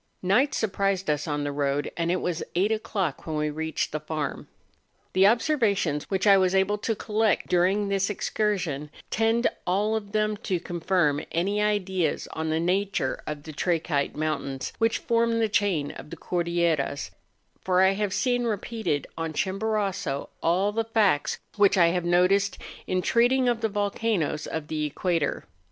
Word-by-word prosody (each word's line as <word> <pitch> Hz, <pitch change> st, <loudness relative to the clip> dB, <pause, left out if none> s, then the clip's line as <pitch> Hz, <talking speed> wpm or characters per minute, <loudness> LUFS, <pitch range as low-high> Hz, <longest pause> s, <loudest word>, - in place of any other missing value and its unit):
Night 235 Hz, +10 st, +3 dB
surprised 195 Hz, -4 st, 0 dB
us 150 Hz, +2 st, -2 dB
on 145 Hz, -1 st, -1 dB
the 145 Hz, -, -2 dB
road; 140 Hz, 0 st, -1 dB
and 170 Hz, 0 st, 0 dB
it 180 Hz, -, 0 dB
was 175 Hz, -2 st, -2 dB
eight 195 Hz, +5 st, +2 dB
o'clock 195 Hz, -9 st, -2 dB
when 160 Hz, -, -2 dB
we 150 Hz, 0 st, 0 dB
reached 160 Hz, +1 st, -2 dB
the 155 Hz, -, -2 dB
farm. 155 Hz, -2 st, -4 dB, 0.7 s
The 190 Hz, +1 st, +6 dB
observations 215 Hz, -, +1 dB
which 190 Hz, 0 st, 0 dB
I 200 Hz, -1 st, +7 dB
was 185 Hz, 0 st, +2 dB
able 195 Hz, +2 st, +2 dB
to 225 Hz, +1 st, -1 dB
collect 215 Hz, -1 st, 0 dB
luring 190 Hz, +4 st, +3 dB
this 195 Hz, 0 st, 0 dB
excursion 185 Hz, -8 st, -1 dB, 0.2 s
tend 225 Hz, +2 st, +2 dB, 0.2 s
all 205 Hz, +4 st, +1 dB
of 205 Hz, -2 st, -4 dB
them 215 Hz, 0 st, 0 dB
to 185 Hz, -3 st, -2 dB
confirm 170 Hz, -4 st, 0 dB, 0.2 s
aiy 200 Hz, +5 st, +1 dB
ideas 190 Hz, -6 st, 0 dB
on 160 Hz, 0 st, -3 dB
the 160 Hz, +1 st, +1 dB
nature 185 Hz, -4 st, 0 dB
of 150 Hz, -1 st, -5 dB
the 155 Hz, -, -9 dB
trachyte 160 Hz, -3 st, 0 dB
mountains 150 Hz, -4 st, -3 dB
which 225 Hz, 0 st, +2 dB
form 230 Hz, 0 st, +1 dB
the 225 Hz, -1 st, +2 dB
chain 200 Hz, -8 st, 0 dB
of -, -, -11 dB
the -, -, -8 dB
Cordilleras; 170 Hz, -5 st, -1 dB, 0.5 s
for 185 Hz, 0 st, +3 dB
I 190 Hz, -, +5 dB
have 205 Hz, 0 st, -1 dB
seen 245 Hz, +3 st, +1 dB
repeated 220 Hz, -, -2 dB
on 165 Hz, -1 st, -3 dB
Chimborazo 195 Hz, -6 st, -1 dB
all 185 Hz, +5 st, +2 dB
the 225 Hz, +2 st, 0 dB
facts 215 Hz, -9 st, +1 dB, 0.2 s
which 200 Hz, -1 st, +4 dB
I 170 Hz, -2 st, +6 dB
have 175 Hz, 0 st, -1 dB
noticed 185 Hz, +3 st, +3 dB, 0.3 s
in 185 Hz, -1 st, 0 dB
treating 250 Hz, +4 st, +3 dB
of 240 Hz, -1 st, +1 dB
the 220 Hz, -, +1 dB
volcanoes 205 Hz, -6 st, -1 dB
of 160 Hz, -2 st, -4 dB
the 155 Hz, 0 st, -2 dB
equator. 165 Hz, +2 st, -1 dB
190 Hz, 165 wpm, -26 LUFS, 160-210 Hz, 0.7 s, I